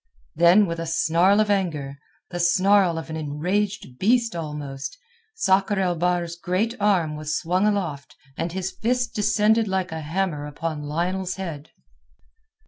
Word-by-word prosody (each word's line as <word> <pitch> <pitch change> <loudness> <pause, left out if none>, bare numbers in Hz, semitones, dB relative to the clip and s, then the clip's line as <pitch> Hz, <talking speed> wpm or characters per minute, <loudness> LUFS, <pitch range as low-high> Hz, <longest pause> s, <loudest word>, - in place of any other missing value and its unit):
Then 175 +5 +5
with 170 -2 -4
a 165 - -4
snarl 170 +5 +3
of 215 -1 +2
anger, 150 -8 -1 0.3
the 175 - -4
snarl 185 0 +3
of 160 0 -6
an - - -4
enraged 160 0 -2
beast 230 +1 +2
almost, 150 - -5 0.4
Sakr 200 - +2
el 180 -2 +1
Bahr's 175 0 0
great 185 +6 -1
arm 185 -7 +2
was 155 +1 -2
swung 180 +4 +1
aloft 170 -10 -2 0.2
and 170 - -3
his 190 +1 -3
fist 240 +5 -1
descended 215 +1 +2
like 190 -1 -1
a 160 0 -4
hammer 155 -2 -2
upon 155 +1 -4
Lionel's 180 +5 -2
head. 165 -6 -6
175 Hz, 145 wpm, -24 LUFS, 160-195 Hz, 0.4 s, Then